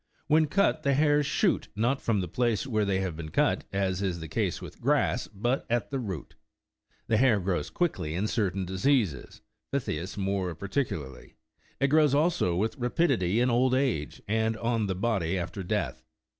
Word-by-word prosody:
When 155 0 +4
cut, 175 -1 +2
the 140 -2 +2
hairs 145 0 +3
shoot, 195 +5 +1
not 120 +6 +1
from 105 -4 +1
the 90 - -3
place 120 +5 0
where 110 -5 0
they 95 -1 0
have 95 -4 -3
been 80 -1 -6
cut, - - +1
as 95 -1 -1
is 90 -3 -1
the 80 - -6
case - - -1
with - - -11
grass, - - +1
but 120 +7 -1
at 120 +3 0
the 135 - -1
root. 95 - -5 0.7
The 110 - +2
hah' 125 -4 +5
grows 90 -5 -1
quickly 90 - -1
in 95 +4 0
cer 110 -2 +1
tain 95 +1 -4
diseases, 95 - 0 0.3
phthisis 95 - -3
more 95 -3 -1
particularly; 80 - -4 0.4
it 140 - +2
grows 150 -1 +4
also 155 - +2
with 110 - -1
rapidity 120 - +1
in 125 +1 +3
old 125 +2 +3
age, 125 - -1
and 110 +1 0
on 115 -2 0
the 95 - -1
body 95 -4 0
after 90 +3 -4
death. 90 - -2
110 Hz, 180 wpm, -28 LUFS, 95-135 Hz, 0.7 s, hah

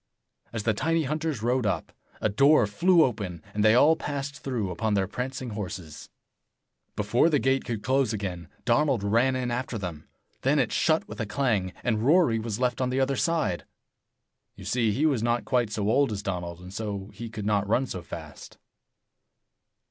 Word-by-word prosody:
As 115 -2 -4
the 110 - +2
tiny 160 +9 +1
hunters 155 -4 -2
rode 125 -1 +1
up, 90 -5 -2 0.3
a - - +1
door 140 +5 +5
flew 170 - +4
open, 100 - -3
and 105 - 0
they 110 +1 +6
all 150 +6 +6
passed 140 -1 -4
through 115 -8 -2
upon 105 +4 -1
their 95 -1 +1
prancing 125 +3 -4
horses. 95 -6 -7 0.9
Before 110 +9 +2
the 150 - +3
gate 135 +1 +1
could 115 -3 -4
close 130 -2 +2
again, 95 -6 -4 0.2
Donald 125 -2 +2
ran 115 +6 +2
in 125 -1 -2
after 125 -1 -2
them. 85 -6 -6 0.3
Then 140 +3 +2
it 130 -6 +1
shut 160 -1 +2
with - - -9
a 110 - -2
clang, 110 -6 0
and 110 -3 0
Rory 145 -5 +4
was 110 -1 -4
left 125 -1 0
on 125 - +1
the 130 +1 0
other 135 +1 +1
side. 155 - 0 0.9
You - - -11
see, 115 -3 +1
he 140 +10 +1
was 140 -8 +2
not 120 +1 0
quite 125 -4 +1
so 105 -1 -2
old 130 +3 +3
as 100 -1 -4
Donald, 90 -3 -4
and 90 +1 -10
so 100 -1 -4
he 115 -1 -7
could 105 -2 -6
not 105 -1 +1
run 125 +4 +2
so 90 -7 -6
fast. - - -10
115 Hz, 185 wpm, -27 LUFS, 105-135 Hz, 0.9 s, they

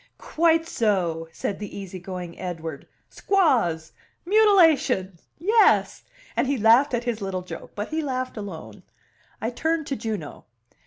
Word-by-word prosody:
"Quite 330 0 +1
so!" 180 - 0
said 195 +4 -4
the 205 -1 -7
easy 190 -2 -7
going 180 -1 -7
Edward 165 -5 -6 0.2
"Squaws! 230 - +1 0.3
Mutilation! 325 - +4 0.2
Yes!" 430 +7 +3 0.3
and - - +1
he 280 0 0
laughed 235 +5 +5
at 240 - -2
his 235 -3 -3
little 190 -2 -3
joke, 180 - -9
but 205 +1 -4
he 315 +1 -1
laughed 255 -3 -3
alone. 200 -7 -8 0.6
I 225 - -2
turned 320 +5 -1
to 275 - -3
Juno. 215 - -5
225 Hz, 140 wpm, -24 LUFS, 185-310 Hz, 0.6 s, laughed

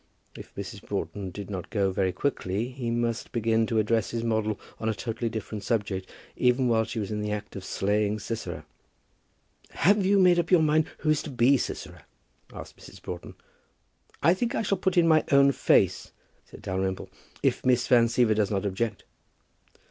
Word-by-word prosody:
If - - -12
Mrs. - - -7
Broughton 100 -2 -4
did 100 +2 -8
not 95 -3 -5
go 100 -3 +1
very 95 0 0
quickly, 105 0 -2
he 125 -2 -5
must 115 -1 -2
begin 115 -2 +1
to 115 - -1
address 110 0 +1
his 115 -1 -3
model 110 -2 0 0.2
on 110 - -1
a 110 - -1
totally 115 +3 -3
different 110 -1 -6
subject, 100 -4 -2 0.3
even 125 +1 +2
while 110 -1 +2
she 115 - -6
was 105 -1 -3
in 105 0 -2
the 105 0 -2
act 105 0 -5
of 95 - -6
slaying 105 +2 0
Sisera. 115 +2 -5 1.0
"Have 200 +2 +3
you 200 +2 +3
made 180 -2 +5
up 170 - -1
your 180 -4 +5
mind 155 0 +3
who 155 - +2
is 155 - +1
to - - -7
be 130 +1 +4
Sisera?" 130 - -5 0.5
asked - - -10
Mrs. - - -13
Broughton. 85 -1 -8 0.9
"I 170 - +6
think 235 +6 -2
I - - 0
shall 195 -2 0
put 185 -1 0
in 170 -1 +5
my 155 -1 +5
own 140 0 +6
face," - - +2 0.4
said - - -14
Dalrymple; 95 -1 -3 0.3
"if - - +1
Miss 125 -1 +3
Van 120 -2 +5
Siever 120 -1 +3
does 105 -2 +1
not 100 -1 -1
object." 105 +4 -2
115 Hz, 185 wpm, -27 LUFS, 105-135 Hz, 1.0 s, I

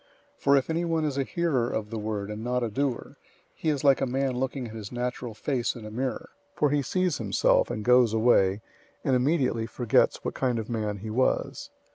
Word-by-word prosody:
001:023 - - -34
For 140 0 +5
if 135 - 0
anyone 165 -1 0
is 145 -3 -1
a - - +2
hearer 135 -6 0
of 105 -2 -3
the 115 - -3
word 105 -1 -3
and 105 +1 -6
not 125 +1 0
a 115 - -2
doer, 135 +1 -2 0.4
he 160 - -2
is 145 -2 -1
like 140 -2 +5
a 135 - +1
man 135 +1 0
looking 130 0 -2
at - - -10
his 105 -3 -7
natural 125 -2 -4
face 125 -1 -1
in 115 -3 -9
a 105 - -7
mirror; 125 +2 -3 0.3
001:024 - - -20
for 150 - +4
he 145 -1 +2
sees 180 +4 0
himself, 100 -4 +2
and 105 -1 -4
goes 125 -2 +5
away, 110 -3 +3 0.4
and 130 - +2
immediately 125 -4 +1
forgets 120 -2 +2
what - - -2
kind 125 -3 0
of 110 +1 -4
man 105 -3 -2
he 110 +2 -6
was. 130 +4 0
125 Hz, 220 wpm, -27 LUFS, 110-135 Hz, 0.4 s, For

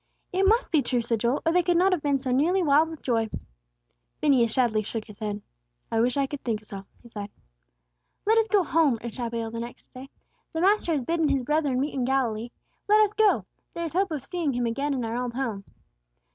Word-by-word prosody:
"It 385 +1 +3
must 455 +4 +2
be 310 -4 +4
true," 250 -1 0
said 230 -1 -1
Joel, 240 +5 0
"or 325 - +3
they 360 +1 +4
could 350 -1 +2
not 375 +2 +4
have 360 -4 +1
been 285 -1 +1
so 260 -1 -3
nearly 340 +9 +2
wild 305 +1 +4
with 320 -2 -10
joy." 225 -3 0 0.9
Phineas 255 -6 +3
sadly 235 -4 +2
shook 215 +1 -5
his 210 -3 -14
head. 210 -1 -4 0.5
"I 225 - +1
wish 245 +3 +1
I 275 - +2
could 280 +1 -7
think 220 -3 -2
so," 195 -2 -8 0.2
he - - -13
sighed. 205 -3 -7 1.0
"Let 445 +2 +4
us 445 - +1
go 410 -3 +3
home," 310 -6 +2
urged 235 0 -7
Abigail, 230 -1 -3
the 230 - -5
next 235 +1 -9
day, 260 +1 -10 0.4
"the 325 - -1
Master 390 -2 +3
has 285 -4 0
bidden 325 +2 +1
His 275 -2 +1
brethren 290 -2 +1
meet 285 +3 -1
Him 270 - -3
in 245 - 0
Galilee. 245 -4 0 0.4
Let 425 +1 +6
us 420 -1 +2
go. 430 -1 +3 0.3
There 340 - -3
is 320 - -5
hope 385 +3 +1
of 295 -5 -5
seeing 340 -5 -2
Him 245 0 -1
again 275 +5 -1
in 250 -3 -2
our 230 +2 -2
old 245 -1 -4
home!" 225 -7 -3
270 Hz, 230 wpm, -26 LUFS, 235-330 Hz, 1.0 s, Let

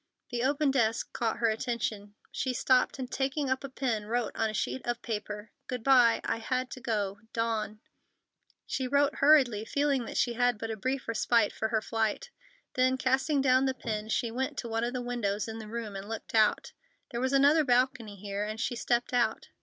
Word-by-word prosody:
The 240 -1 -1
open 280 +2 +2
desk 225 -4 0
caught 230 -2 -1
her 235 -1 +2
attention. 215 -3 -3 0.2
She 260 - -2
stopped 255 +2 +2
and, 260 -1 -5
taking 270 0 -1
up 260 - -1
a 275 - -5
pen, 235 -6 -2
wrote 235 -1 -1
on 225 - 0
a - - -5
sheet 260 - -2
of 240 0 -3
paper: 210 -1 -5 0.2
Goodby. 250 -1 +4
I - - -1
had 255 +2 -2
to 255 - -8
go.—DAWN. 215 0 -2 0.8
She 260 - -2
wrote 280 +1 +2
hurriedly, 270 -8 +5
feeling 280 +1 0
that - - -5
she 240 - +2
had 245 -1 +2
but 225 +1 -4
a - - -3
brief 260 +5 -3
respite 230 -1 +2
for 220 - -1
her 220 -1 0
flight. 225 - -1 0.4
Then, 255 0 +2
casting 270 +3 +1
down 260 0 +4
the 265 -1 0
pen, 215 -3 -4
she 230 +1 0
went 260 +3 -3
to 235 - -3
one 225 0 -1
of 240 +1 -1
the 250 -1 -3
windows 215 -4 -2
in 225 0 -6
the 220 - -8
room 225 -3 -5
and 195 +2 -7
looked 225 -1 -6
out. 220 -2 +3 0.4
There 235 -1 -3
was 260 0 +1
another 285 +3 +5
balcony 245 -4 +1
here, 200 +1 -4
and 215 +1 -4
she 245 +2 -1
stepped 240 +1 0
out. 245 -1 +1
240 Hz, 200 wpm, -29 LUFS, 220-260 Hz, 0.8 s, hurriedly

